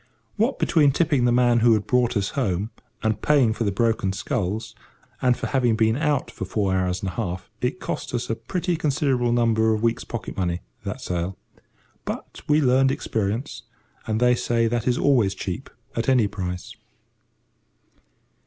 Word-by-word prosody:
What 230 +6 +1
between 150 -4 +4
tipping 145 -4 +2
the 120 - +3
man 120 -1 +4
who 115 0 +5
had 105 -1 -2
brought 125 0 +2
us 100 -1 0
home, 105 -5 -1 0.3
and 110 -1 0
paying 135 -7 +4
for 115 0 -2
the 100 - +1
broken 110 -2 +1
sculls, 110 0 -2 0.5
and 125 -2 +3
for - - -4
having 125 -4 +2
been 110 0 +2
out 150 -1 0
four 95 0 -1
hours 90 0 0
and 95 - -1
a - - -7
half, 90 +4 -4
it 125 +9 -1
cost - - -4
us 120 - -2
a - - 0
pretty 180 +6 -2
considerable 135 -5 +1
number 110 -2 +3
of 105 - -4
weeks' 115 0 +1
pocket 120 - -6
money, 90 -2 -1 0.2
that - - -4
sail. 90 +1 -3 0.7
But - - -6
we 150 +1 +4
learned 135 0 +4
experience, 110 +2 -2 0.5
and 110 0 0
they 125 0 +5
say 120 -1 +1
that 115 +1 -1
is 125 0 +2
always 120 -9 +3
cheap 95 +8 -5 0.3
at 115 +3 0
any 125 -5 +4
price. 90 -2 -5
115 Hz, 170 wpm, -24 LUFS, 100-130 Hz, 0.7 s, who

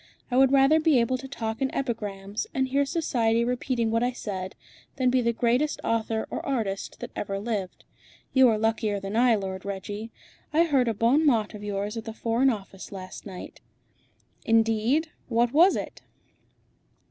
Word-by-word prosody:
I - - 0
would 265 0 +5
rather 275 +3 +5
be 310 -5 +4
able 255 +2 +1
to 270 - -8
talk 225 -4 -4
in 265 - +2
epigrams, 205 -5 -3
and 265 -1 +1
hear 280 +1 +1
Society 235 -8 +1
repeating 245 -2 -1
what 230 0 +1
I 250 +1 +1
said, 190 -5 -5 0.4
than 255 -2 +2
be 255 0 +3
the 235 0 +2
greatest 245 +6 +1
author 225 -1 0
or - - -4
artist 220 -8 -3
that - - -6
ever 195 -1 -3
lived. 200 -3 -4 0.5
You 260 -2 +6
are 220 - +2
luckier 215 -2 0
than 195 +2 -5
I, 240 0 +5
Lord 190 -2 -4
Reggie. 205 +3 -5 0.4
I 320 +2 +4
heard 275 -7 +2
a 225 - 0
bon 240 +8 +3
mot 230 -8 +2
of 210 -1 -9
yours 205 +1 -3
at 225 - -5
the 225 - -6
Foreign 235 +4 +2
Office 195 -4 -6
last 185 +1 -8
night." 185 -2 -9 0.8
"Indeed. 225 +7 +2 0.2
What 235 +1 +1
was 345 +6 +6
it?" - - -5
230 Hz, 175 wpm, -26 LUFS, 210-260 Hz, 0.8 s, You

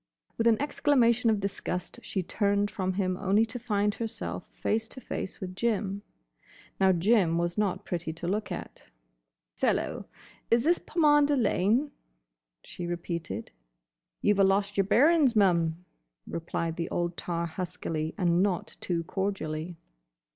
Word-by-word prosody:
With 230 - +1
an 225 -2 +4
exclamation 250 -5 +3
of 215 -2 +2
disgust 195 -2 -3
she 190 - -3
turned 205 +2 +1
from 185 -3 -1
him 185 -1 0
only 200 +3 +3
to 225 +2 -7
find 210 -3 0
herself 90 - -5
face 225 +1 -2
to 260 - -10
face 220 - -5
with 185 -1 -6
Jim. 205 -2 -1 0.8
Now 190 0 +5
Jim 180 -1 +3
was 175 0 0
not 210 -3 -1
pretty 170 -2 -3
to 170 +1 -6
look 210 +4 -1
at. - - -7 0.7
"Fellow, - - -1 0.4
is 230 0 +4
this 340 +4 +3
Pomander 295 -3 +3
Lane?" 235 +5 +2 0.7
she 175 - -7
repeated. 170 - -4 0.7
"You 210 - +5
've 200 - -3
a - - +7
lost 200 +1 +2
yer 195 - +3
bearin's, 275 - +4
mum," 175 -4 +2 0.4
replied 165 0 -3
the 170 - -2
old 175 0 -1
tar 170 -1 -2
huskily 160 -2 -4
and 175 -3 +3
not 190 -3 -1
too 170 -2 -1
cordially. 175 -3 -3
195 Hz, 145 wpm, -28 LUFS, 175-225 Hz, 0.8 s, a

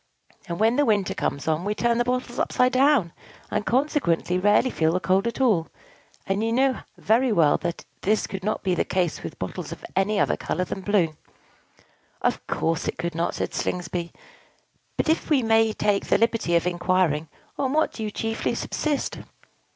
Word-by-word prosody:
And, 170 - -3
when 225 +4 +3
the 290 - +4
winter 205 -5 +1
comes 140 - -3
on, 160 +1 +1
we 205 +2 -1
turn 235 +1 +1
the - - +3
bottles 250 0 -2
upside 250 0 +2
down, 260 - +3 0.4
and 210 - 0
consequently 215 - +1
rarely 210 +6 +3
feel 160 0 +1
the 180 - +1
cold 185 +5 +1
at 235 - -4
all; 210 -11 +3 0.6
and 195 +3 -1
you 225 - 0
know 260 +2 +2 0.2
very 235 +4 +2
well 160 -8 +4
that 170 - -4 0.2
this 215 +2 +1
could 195 -1 -6
not 215 - -2
be 185 - +1
the - - +1
case 180 -3 -1
with - - -7
bottles - - -5
of - - -8
any 200 +2 +2
other - - +2
color 180 - -2
than 195 - -5
blue." 185 -5 +1 1.1
"Of - - 0
course 165 +1 -1
it - - -2
could 170 -1 -3
not," 165 +1 -1
said - - -3
Slingsby. 175 -1 -3 0.9
"But, - - 0
if 320 +1 +1
we 280 -5 +3
may 225 0 +4
take 205 -1 0
the - - +4
liberty 230 -7 +1
of 170 - +2
inquiring, 175 -3 +1 0.3
on 270 -2 0
what 310 +2 +1
do - - -7
you 215 - -2
chiefly 225 +2 -2
subsist?" 300 -2 -2
205 Hz, 190 wpm, -24 LUFS, 175-240 Hz, 1.1 s, the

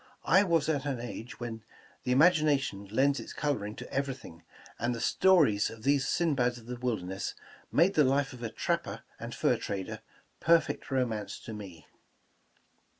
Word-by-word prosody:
I 190 +3 +6
was 165 -6 +2
at 145 -4 0
an 135 -4 -2
age 120 +1 -7
when 115 -2 -5 0.4
the 125 - 0
imagina 150 0 +5
tion 100 -7 -5
lends 135 +7 +2
its - - -8
coloring 110 -8 -2
to - - -9
everything, 135 -11 -4 0.4
and 120 +1 0
the - - -5
stories 145 - +4
of 115 -1 -11
these 140 0 +2
Sinbads 135 -8 +1
of 115 - -13
the 125 +1 -5
wilderness, 100 -7 -3 0.4
made 175 +5 +4
the 150 - +5
life 135 +1 +1
of 125 - -11
a 115 - -3
trap - - -1
per - - -7 0.2
and - - -6
fur - - +2
trader 95 -2 -4 0.4
perfect 165 0 +2
romance 115 -6 -1
to 110 - -8
me.' 95 -7 -9
125 Hz, 170 wpm, -30 LUFS, 110-145 Hz, 0.4 s, I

